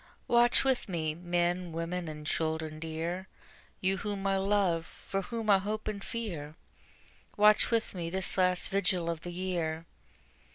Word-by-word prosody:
Watch 240 Hz, +1 st, +6 dB
with 265 Hz, -5 st, +1 dB
me, 160 Hz, -4 st, -1 dB
men, 175 Hz, +1 st, -1 dB
women, 170 Hz, +1 st, -3 dB
and 150 Hz, -1 st, -7 dB
children 160 Hz, -1 st, -1 dB
dear, 165 Hz, +3 st, -4 dB, 0.5 s
You 190 Hz, +1 st, +1 dB
whom 200 Hz, 0 st, -4 dB
I 195 Hz, 0 st, +2 dB
love, 190 Hz, -4 st, +2 dB
for 195 Hz, -, -4 dB
whom 225 Hz, +3 st, -5 dB
I 195 Hz, -, +6 dB
hope 215 Hz, +2 st, -4 dB
and 205 Hz, -2 st, -3 dB
fear, 170 Hz, -10 st, -5 dB, 0.8 s
Watch 210 Hz, 0 st, +6 dB
with 230 Hz, -1 st, 0 dB
me 170 Hz, -3 st, -4 dB
this 190 Hz, +1 st, 0 dB
last 180 Hz, -1 st, +3 dB
vigil 180 Hz, -3 st, +1 dB
of 165 Hz, -1 st, -5 dB
the 175 Hz, -, -6 dB
year. 170 Hz, -3 st, -2 dB
180 Hz, 155 wpm, -31 LUFS, 165-200 Hz, 0.8 s, Watch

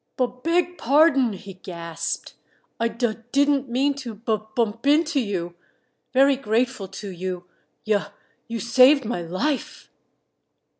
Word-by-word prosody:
"Bub 250 Hz, 0 st, -1 dB
beg 355 Hz, +3 st, 0 dB
pardon," 275 Hz, -3 st, +4 dB
he 195 Hz, 0 st, -9 dB
gasped. 170 Hz, -3 st, -5 dB, 0.5 s
"I 230 Hz, -, +2 dB
dud 230 Hz, 0 st, -2 dB
didn't 280 Hz, -1 st, +2 dB
mean 270 Hz, +4 st, +2 dB
to 240 Hz, -5 st, -6 dB
bub 215 Hz, 0 st, -3 dB
bump 230 Hz, +2 st, -1 dB
into 305 Hz, +1 st, +3 dB
you. 185 Hz, -7 st, -3 dB, 0.6 s
Very 275 Hz, +1 st, +5 dB
grateful 240 Hz, -2 st, 0 dB
to 195 Hz, +2 st, -8 dB
you 180 Hz, 0 st, -5 dB, 0.4 s
yuh 210 Hz, -2 st, +1 dB, 0.4 s
you 230 Hz, 0 st, -4 dB
saved 255 Hz, +4 st, +5 dB
my 215 Hz, -6 st, -2 dB
life!" 185 Hz, -, -3 dB
235 Hz, 130 wpm, -24 LUFS, 205-275 Hz, 0.6 s, Very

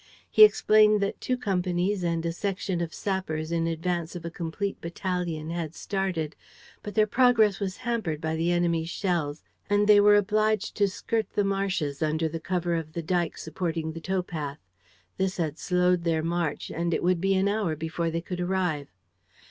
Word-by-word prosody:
He 435 Hz, -, +8 dB
explained 215 Hz, -, +6 dB
that 200 Hz, -, -2 dB
two 255 Hz, -, 0 dB
companies 185 Hz, -2 st, 0 dB
and 170 Hz, -1 st, -1 dB
a 165 Hz, -, 0 dB
section 190 Hz, 0 st, -2 dB
of 170 Hz, -1 st, -3 dB
sappers 165 Hz, -6 st, -3 dB
in 165 Hz, -1 st, 0 dB
advance 165 Hz, +1 st, -2 dB
of 170 Hz, -1 st, -7 dB
a 170 Hz, -, -4 dB
complete 175 Hz, +4 st, -4 dB
battalion 170 Hz, -2 st, -3 dB
had 170 Hz, -2 st, -4 dB
started, 185 Hz, -6 st, -2 dB, 0.5 s
but 205 Hz, -2 st, -7 dB
their 215 Hz, -, +5 dB
progress 225 Hz, -3 st, +4 dB
was 195 Hz, -2 st, -3 dB
hampered 220 Hz, -11 st, -1 dB
by 160 Hz, 0 st, -2 dB
the 165 Hz, +2 st, +1 dB
enemy's 170 Hz, -2 st, +1 dB
shells 170 Hz, -6 st, -2 dB, 0.3 s
and 205 Hz, 0 st, +3 dB
they 205 Hz, -1 st, +7 dB
were 205 Hz, 0 st, +7 dB
obliged 215 Hz, +1 st, +1 dB
to 205 Hz, -1 st, +4 dB
skirt 220 Hz, +3 st, -2 dB
the 205 Hz, -, +3 dB
marshes, 190 Hz, -8 st, -1 dB
under 155 Hz, +1 st, +1 dB
the 165 Hz, +1 st, -4 dB
cover 175 Hz, +1 st, -1 dB
of 160 Hz, -2 st, -3 dB
the 170 Hz, -, -4 dB
dyke 175 Hz, 0 st, 0 dB
supporting 160 Hz, 0 st, -3 dB
the 165 Hz, +1 st, -8 dB
towpath. 165 Hz, -6 st, -3 dB, 0.6 s
This 190 Hz, 0 st, -1 dB
had 160 Hz, -3 st, -2 dB
slowed 180 Hz, -1 st, +2 dB
their 165 Hz, -2 st, +1 dB
march; 170 Hz, -2 st, -2 dB
and 170 Hz, 0 st, -1 dB
it -, -, -2 dB
would 180 Hz, -1 st, +2 dB
be 195 Hz, 0 st, +2 dB
an 190 Hz, +1 st, +2 dB
hour 200 Hz, -6 st, 0 dB
before 160 Hz, +2 st, -2 dB
they 165 Hz, +1 st, -2 dB
could 180 Hz, +1 st, -6 dB
arrive. 175 Hz, -5 st, -1 dB
175 Hz, 180 wpm, -27 LUFS, 165-195 Hz, 0.6 s, He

